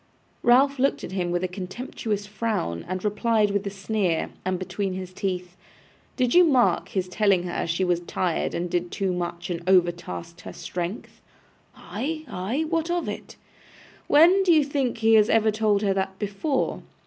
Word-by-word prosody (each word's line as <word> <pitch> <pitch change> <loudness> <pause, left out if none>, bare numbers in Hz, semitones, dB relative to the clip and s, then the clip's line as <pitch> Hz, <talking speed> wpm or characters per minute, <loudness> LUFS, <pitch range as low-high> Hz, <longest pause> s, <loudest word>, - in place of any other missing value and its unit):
Ralph 265 +3 +4
looked 275 +2 +1
at - - -6
him 180 -2 -1
with 175 +1 -1
a - - +1
contemptuous 205 +2 -4
frown, 205 - -2
and 185 +2 -4
replied 210 0 +2
with 200 0 -1
a - - 0
sneer, 195 -3 -1
and 185 0 -1
between 190 +1 -3
his 185 0 -6
teeth: 180 -2 -3 0.6
'Did 250 -2 +1
you 360 - +8
mark 265 -7 +3
his 185 -2 -2
telling 190 -1 +2
her 175 -1 -3
she 170 +3 0
was 175 -2 +1
tired 175 0 -2
and 175 +1 -2
did 175 0 -1
too 190 0 -1
much, 175 0 -4
and 170 -1 -3
overtasked 175 -1 0
her - - -9
strength?' 180 +4 -6 0.5
'Ay, 315 +3 -5
ay. 220 +12 -2
What 330 0 -1
of 350 0 -1
it?' - - -6 0.7
'When 345 +6 +6
do 375 -2 +3
you 310 -3 +5
think 275 -4 -1
he 225 0 +4
ever 220 +1 +4
told 215 -1 +1
her 195 -1 +2
that 190 0 -2
before? 210 +8 -1
200 Hz, 170 wpm, -25 LUFS, 180-235 Hz, 0.7 s, you